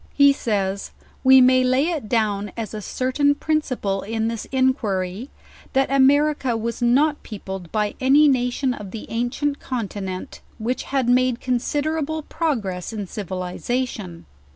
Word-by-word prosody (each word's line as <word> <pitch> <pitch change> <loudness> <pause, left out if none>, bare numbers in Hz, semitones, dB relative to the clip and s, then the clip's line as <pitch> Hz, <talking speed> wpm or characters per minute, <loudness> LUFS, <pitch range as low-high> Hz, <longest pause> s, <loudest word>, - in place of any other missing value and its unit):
He 280 -1 +6
says, 200 -6 -2 0.3
"We 265 0 +8
may 255 0 +5
lay 260 +5 +2
it 300 -11 -3
down 210 -3 0
as 225 -1 -4
a 215 - -5
certain 260 +6 +1
principle 255 -11 -1
in 225 +1 -2
this 230 -1 -4
inquiry,. 235 -5 0 0.4
that 270 0 +2
America 275 -2 +3
was 230 +2 -4
not 280 +5 +3
peopled 190 -5 -7
by 210 -1 0
a^y 280 +4 +6
nation 255 0 +1
of 210 -4 -8
the 220 +2 -7
ancient 245 +5 -1
continent, 200 -6 -5 0.2
which 240 +4 -2
had 265 -3 0
made 250 0 +3
considerable 300 +5 -1
progress 225 - -2
in 210 -3 -4
civiliza 195 +7 -3
tion. 180 -8 -9
245 Hz, 140 wpm, -22 LUFS, 210-275 Hz, 0.4 s, We